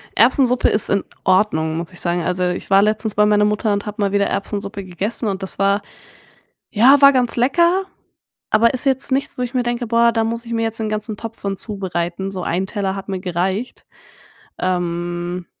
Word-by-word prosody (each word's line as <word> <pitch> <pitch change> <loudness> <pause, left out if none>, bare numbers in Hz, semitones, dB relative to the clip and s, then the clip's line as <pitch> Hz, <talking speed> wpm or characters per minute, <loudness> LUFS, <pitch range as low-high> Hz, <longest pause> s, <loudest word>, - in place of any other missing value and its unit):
Erbsensuppe 250 +2 +3
ist 210 - +1
in 200 -1 +1 0.2
Ordnung, 175 -5 +1
muss 170 +1 -5
ich 175 - -12
sagen. 175 -1 -1
Also, 180 +1 +1
ich 180 - -5
war 195 0 +6
letztens 215 0 0
bei 210 - +4
meiner 210 0 +3
Mutter 210 0 0
und 200 +2 -2
habe 210 0 -5
mal 200 -1 +1
wieder 200 0 +2
Erbsensuppe 200 0 -4
gegessen 200 +6 -3
und 195 -1 -3
das 190 - -2
war 200 +1 +2 0.9
ja, 265 +6 +6
war 280 0 +8
ganz 250 -3 +1
lecker, 340 +10 +2 0.6
aber 230 +4 +3
ist 255 - -4
jetzt 265 0 0
nichts, 270 0 -1
wo - - -3
ich 245 - -5
mir 250 -1 +1
denke: 240 0 -2
„Boah, 235 +1 +4
da 225 -1 0
muss 230 +1 -2
ich 230 - -5
mir 230 0 0
jetzt 225 0 -2
den 220 - -2
ganzen 215 0 -3
Topf 225 0 -8
von 195 -1 -3
zubereiten.“ 190 -2 -2
So 185 -2 -5
1 180 +3 -1
Teller 195 -1 -3
hat 195 0 -8
mir 190 -1 -2
gereicht. 185 +6 -3 0.7
Ähm. 175 0 -2
205 Hz, 205 wpm, -19 LUFS, 185-230 Hz, 0.9 s, war